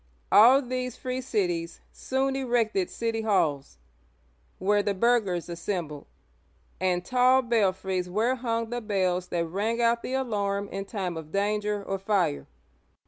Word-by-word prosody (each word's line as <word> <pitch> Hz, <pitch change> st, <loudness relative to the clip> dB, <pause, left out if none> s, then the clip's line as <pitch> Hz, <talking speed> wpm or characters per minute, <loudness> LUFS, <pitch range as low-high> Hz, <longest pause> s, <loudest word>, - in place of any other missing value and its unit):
All 255 Hz, +6 st, +7 dB
these 250 Hz, -1 st, -3 dB
free 255 Hz, 0 st, -3 dB
cities 175 Hz, -8 st, -2 dB
soon 265 Hz, +1 st, -1 dB
erected 235 Hz, -8 st, 0 dB
city 230 Hz, -1 st, -2 dB
halls, 160 Hz, -10 st, 0 dB, 0.8 s
where 205 Hz, +2 st, +2 dB
the 205 Hz, -1 st, -1 dB
burghers 200 Hz, -5 st, +1 dB
assembled, 170 Hz, -4 st, -4 dB, 0.7 s
and 180 Hz, -1 st, 0 dB
tall 255 Hz, +2 st, +4 dB
belfries 190 Hz, -5 st, 0 dB
where 220 Hz, +7 st, +1 dB
hung 230 Hz, -2 st, -2 dB
the 240 Hz, 0 st, -2 dB
bells 185 Hz, -4 st, 0 dB
that 170 Hz, -1 st, -1 dB
rang 205 Hz, +7 st, -2 dB
out 235 Hz, 0 st, +2 dB
the 255 Hz, -, -5 dB
alarm 205 Hz, -6 st, -1 dB
{tocsin) -, -, -12 dB
in 195 Hz, 0 st, -4 dB
time 190 Hz, -5 st, -4 dB
of 155 Hz, -1 st, -8 dB
danger 210 Hz, +1 st, -1 dB
or 195 Hz, 0 st, -3 dB
fire. 185 Hz, -7 st, 0 dB
205 Hz, 140 wpm, -27 LUFS, 185-235 Hz, 0.8 s, All